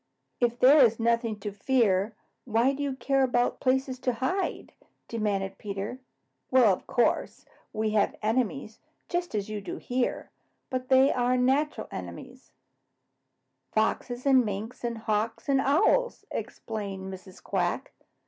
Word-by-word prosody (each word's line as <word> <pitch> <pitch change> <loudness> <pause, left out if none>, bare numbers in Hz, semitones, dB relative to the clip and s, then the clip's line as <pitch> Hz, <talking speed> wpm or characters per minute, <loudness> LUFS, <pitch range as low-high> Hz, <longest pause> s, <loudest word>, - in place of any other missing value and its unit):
"If 240 -1 +1
there 270 +3 +7
is 230 -1 +3
nothing 230 -2 +1
to 210 - -4
fear, 210 -2 +1 0.3
why 240 +3 +2
do 280 - -5
you 280 -2 -1
care 270 0 +1
about 245 -2 +1
places 260 0 0
to 250 - 0
hide?" 335 +12 -2 0.3
demanded 200 -4 -2
Peter. 200 +4 -5 0.5
"Well, 245 -6 +5
of - - -7
course, 240 - 0 0.3
we 215 0 -1
have 210 -1 +2
enemies, 215 - -1 0.3
just 350 -8 -2
as 205 -2 -1
you 215 -1 -4
do 195 - -6
here, 250 0 -2 0.4
but 255 -1 -3
they 265 +1 +5
are 250 0 +1
natural 270 +4 +1
enemies, - - -9 1.2
Foxes 240 +3 0
and 265 -2 +5
Minks 215 +3 -5
and 235 -1 -2
Hawks 225 +2 -2
and 270 -1 +3
Owls," 415 - +2
explained 195 -4 -5
Mrs. 185 0 -12
Quack. 185 +6 -1
235 Hz, 140 wpm, -28 LUFS, 210-260 Hz, 1.2 s, there